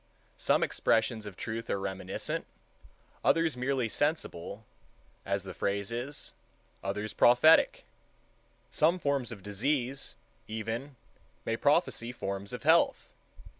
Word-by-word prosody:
Some - - +3
expressions 110 -1 +1
of 95 - -9
truth 115 +1 -4
are 100 - 0
reminiscent,—others 100 - -3
merely 125 -1 0
sensible, 110 - -2 0.6
as 100 -1 0
the 95 - -7
phrase 100 +1 -1
is,—others 110 -5 -5
prophetic. 125 +7 +5 0.9
Some 165 +4 +3
forms 140 -7 -1
of 100 -5 -9
disease, 130 +6 -1 0.3
even, 115 +6 -4 0.5
may - - 0
prophesy 115 +1 +2
forms 100 -4 -5
of - - -6
health. - - +4
115 Hz, 100 wpm, -30 LUFS, 100-135 Hz, 0.9 s, prophetic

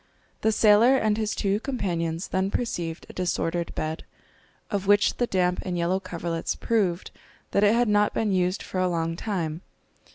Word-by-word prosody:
The 220 - +3
sailor 220 +4 +5
and 215 -4 +1
his 215 -1 -2
two 200 0 0
companions 175 - -2
then 190 +1 0
perceived 175 -8 -3
a - - -12
disordered 175 -1 -1
bed, 155 +1 -3 0.7
of 200 -2 -2
which 205 +1 +4
the 245 - +1
damp 180 -3 +1
and 180 -2 -3
yellow 175 +2 +1
coverlets 170 -3 -3
proved 195 -7 0 0.4
that 200 - +2
it 210 +2 +5
had 240 0 +3
not 210 0 +3
been 215 -2 0
used 185 0 0
for 185 - -4
a 185 0 +2
long 165 -1 -1
time. 170 -5 -3
190 Hz, 170 wpm, -25 LUFS, 170-210 Hz, 0.7 s, sailor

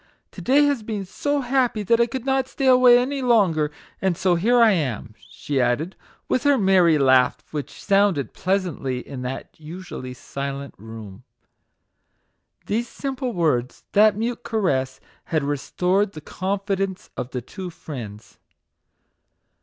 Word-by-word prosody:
To - - -10
day 280 +3 +4
has 285 -5 +1
been 210 -2 -4
so 285 +9 -1
happy 245 -4 +1
that 230 +3 +3
I 235 - +3
could 250 +1 -5
not 265 -1 +1
stay 270 - -4
away 255 -1 +7
any 270 +3 -1
longer, 195 - +3 0.3
and 190 -3 +1
so 185 -2 +2
here 225 +9 +3
I 230 -2 +6
am," 130 - -2 0.2
she 140 -2 -2
added, 125 +9 0 0.3
with 255 - +1
her 285 0 +4
merry 185 -6 +4
laugh, 130 -2 +3
which 150 -2 -5
sounded 195 - +2
pleasantly 175 -9 -2
in 135 -2 -7
that 125 +1 -6
usually 155 -5 -8
silent 140 +2 -6
room. 110 -1 -10 1.4
These 230 +4 -1
simple 265 -2 -4
words, 150 -8 0
that 210 0 +5
mute 235 +2 -2
caress, 135 - -1 0.3
had 155 -3 0
restored 180 +8 0
the 155 - -9
confidence 195 +2 -3
of 125 - -4
the 125 -1 -4
two 185 - -7
friends. 115 -10 -9
185 Hz, 145 wpm, -23 LUFS, -, 1.4 s, away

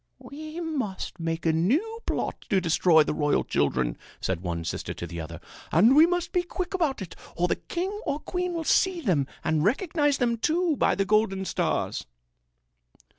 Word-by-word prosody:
"We 310 +3 -8
must 270 - -4
make 165 0 -3
a 160 - +3
new 300 - +1
plot - - -2
to 195 - +3
destroy 165 -2 +4
the - - -2
royal 150 -1 +1
children," - - 0 0.2
said 95 -3 -2
one 85 -2 -3
sister 80 - -4
to - - -5
the 85 0 -6
other. 80 +1 -8 0.3
"And 220 +11 +6
we 315 +3 +8
must 355 -1 -1
be 360 - +2
quick 360 +2 -5
about 310 - 0
it 180 - -10 0.2
or 175 +1 +1
the - - 0
king 365 +3 -3 0.2
or 285 - 0
queen 360 +2 -3
will 330 - -2
see 365 +2 +2
them 165 - +1 0.2
and 155 -1 +1
recognize 290 - +1
them, 235 -2 +1
too, 330 +6 +1
by - - +2
the 195 - 0
golden 205 -2 +2
stars." - - -1
225 Hz, 180 wpm, -26 LUFS, -, 0.3 s, we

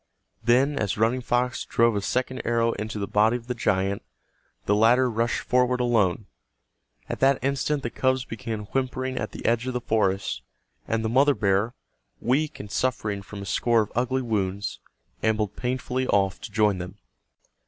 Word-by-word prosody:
Then, 130 +5 +3
as 105 -1 -1
Running 115 +4 +2
Fox 125 +1 0
drove 115 -1 +2
a 100 - 0
second 130 +5 -1
arrow 115 0 +2
into 110 0 -5
the 100 - -2
body 110 +4 +3
of 120 - -13
the 125 - -2
giant, 100 -4 0 0.6
the 105 - +2
latter 120 +5 +5
rushed 115 +1 0
forward 125 0 +2
alone. 110 -5 +2 0.8
At - - -4
that 135 0 +4
instant 140 +1 0
the 120 - -3
cubs 130 -1 +1
began 115 -2 -5
whimpering 130 0 -1
at - - -3
the - - -9
edge 115 +2 +1
of 130 - -2
the - - +1
forest, 100 -4 0 0.5
and 115 0 -1
the - - +1
mother 140 +4 +4
bear, 100 +3 +1 0.4
weak 145 +5 0
and 100 0 -8
suffering 105 -5 -1
from 100 0 -8
a - - -7
score 115 +4 +2
of 105 - -10
ugly 125 +2 0
wounds, 100 -4 -2 0.4
ambled 110 -2 0
painfully 130 +1 -2
off 95 -1 +1
to 110 - -8
join 105 -3 +2
them. 90 0 -7
115 Hz, 175 wpm, -25 LUFS, 105-130 Hz, 0.8 s, latter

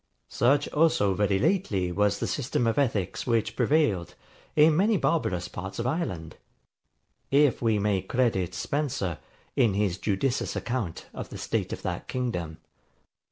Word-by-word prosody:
Such 140 +4 +2
also 150 -11 +3
very 100 0 +1
lately 100 - +1
was 105 +2 +2
the - - -2
system 130 -3 -1
of 115 +4 +1
ethics 110 -5 -1
which 115 -2 +1
prevailed 125 - +1 0.4
in 155 +1 +6
many 205 +5 +3
barbarous 90 - 0
parts 95 +2 -7
of 115 - -2
Ireland; 110 - -3 0.9
if 140 -1 +3
we 115 -3 +2
may 100 -2 +1
credit 95 -4 0
Spencer, 135 - -2 0.4
in 110 -5 +3
his 100 -3 0
judicious 115 +7 -1
account 120 -9 -3
of - - -6
the - - -8
state - - -2
of - - -6
that - - -4
kingdom. 90 -11 -3
115 Hz, 145 wpm, -27 LUFS, 95-140 Hz, 0.9 s, in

